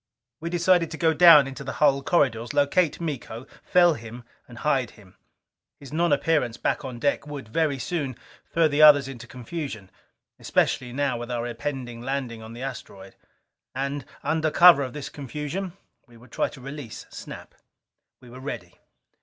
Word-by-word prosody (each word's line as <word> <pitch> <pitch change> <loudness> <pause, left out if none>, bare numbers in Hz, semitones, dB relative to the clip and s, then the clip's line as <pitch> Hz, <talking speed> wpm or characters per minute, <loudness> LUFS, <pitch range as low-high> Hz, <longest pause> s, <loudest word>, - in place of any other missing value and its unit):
We 170 - -4
decided 175 -1 +2
to 160 - -7
go 160 -1 +2
down 160 -3 +8
into 135 0 -7
the 130 - -5
hull 140 -2 +3
corridors. 130 -5 0
Locate 145 +3 +2
Miko. 130 -7 -5 0.2
Fell 175 -2 +4
him 115 -2 -9 0.2
and 120 - -13
hide 135 -3 0
him. 95 -3 -19 0.6
His 140 -1 -12
nonappearance 155 -6 +1
back - - -1
on 130 -3 -6
deck 140 +3 -1
would 145 -5 -7
very 150 +2 0
soon 140 -2 -3 0.4
throw 165 -1 +3
the 145 0 +1
others 145 -3 +8
into 120 -3 -9
confusion, 125 - -7 0.5
especially 125 -1 0
now 135 -2 -1
with 120 0 -7
our 120 -1 -2
impending 120 0 -5
landing 125 -3 -4
upon 110 +1 -10
the 120 +2 -8
asteroid. 95 -7 -8 0.6
And, 140 +1 -3 0.2
under 160 0 0
cover 170 -1 +7
of 130 -3 -4
this 145 -2 -6
confusion, 150 +7 -5 0.3
we 120 -1 -18
would 120 +1 -18
try - - 0
to - - -13
release 135 -3 -8
Snap. - - -10 0.7
We 125 - -15
were 125 - -10
ready. 90 -10 -7
140 Hz, 165 wpm, -25 LUFS, 120-150 Hz, 0.7 s, down